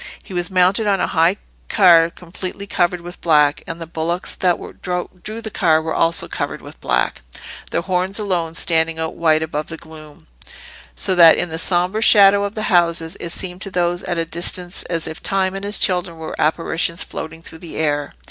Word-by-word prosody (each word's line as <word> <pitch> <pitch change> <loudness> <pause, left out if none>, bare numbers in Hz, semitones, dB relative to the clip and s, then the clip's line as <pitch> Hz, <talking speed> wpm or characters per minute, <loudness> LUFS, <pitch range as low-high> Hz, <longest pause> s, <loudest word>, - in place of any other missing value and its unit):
He - - -11
was 175 +1 0
mounted 190 +3 +2
on 195 -2 +2
a - - +1
high 170 +4 +2 0.3
car 170 -5 +6
completely 180 +3 -7
covered 175 -2 0
with 175 +1 -10
black, 150 -3 +3
and 165 0 -6
the 165 - -5
bullocks 165 +2 -3
that 180 -2 +2 0.2
drew 180 +4 -5
the 220 -2 -5
car 160 -6 +3
were 160 0 -3
also 165 0 +2
covered - - -4
with - - -13
black, - - 0 0.5
their - - -1
horns 185 +1 -1
alone 175 -6 -2
standing 165 -1 +2
out 160 0 -3
white 160 -1 +2
above 155 -1 -4
the 165 - -7
gloom; 155 -2 -14 0.7
so 185 - +1
that 170 -3 +7
in 175 - -1
the 160 0 -4
sombre 180 +5 0
shadow 200 -2 +6
of 200 - -5
the 215 - -3
houses 170 -2 +2
it 170 - -5
seemed 180 +1 -6
to - - -4
those 175 -1 0
at 175 -2 -2
a 165 - 0
distance 175 +2 +1
as 165 -2 -2
if 160 - -6
Time 190 -1 0
and 195 0 -6
his 205 +1 +1
children 180 -3 0
were 160 -1 -7
apparitions 165 +2 0
floating 165 +1 -8
through 160 - -11
the 170 -1 -9
air. 145 -2 -1
175 Hz, 195 wpm, -19 LUFS, 165-185 Hz, 0.7 s, that